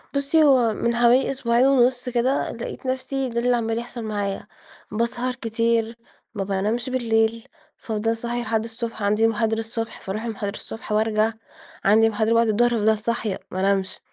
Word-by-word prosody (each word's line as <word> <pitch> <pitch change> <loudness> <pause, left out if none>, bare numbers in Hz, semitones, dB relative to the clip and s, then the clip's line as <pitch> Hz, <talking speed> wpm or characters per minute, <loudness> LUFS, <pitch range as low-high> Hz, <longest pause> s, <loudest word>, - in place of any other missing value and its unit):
بُصي، 285 +3 +3
هو 250 -6 +4
من 235 +2 -1
حوالي 240 +3 +4
أسبوعين 245 -1 +2
ونُص 250 -1 +3
كده، 250 +3 0
لقيت 235 +3 -7
نفسي 260 0 -2
ده 235 0 -2
اللي 245 0 +2
عمّال 225 0 -1
يحصل 240 -1 -7
معايا، 205 -2 -3 0.4
باسهر 240 +3 -1
كتير، 230 -1 0 0.4
ما 200 -2 -2
بانامش 210 +6 -1
بالليل، 230 -1 0 0.3
فأفضل 225 +1 -2
صاحية 240 +1 -3
لحد 220 -1 -1
الصبح، 225 -2 -5
عندي 210 +2 +3
محاضرة 225 0 0
الصبح 225 0 -5
فأروح 210 +4 -4
المحاضرة 210 -3 -4
الصبح 220 - -8
وأرجع، 215 +1 +2 0.5
عندي 220 +2 +5
محاضرة 220 +1 +1
بعد 230 0 +4
الضهر 240 +3 +3
فافضل 220 -2 +2
صاحية 220 -2 -2
مانامش، 190 0 0
230 Hz, 155 wpm, -23 LUFS, 220-240 Hz, 0.5 s, عندي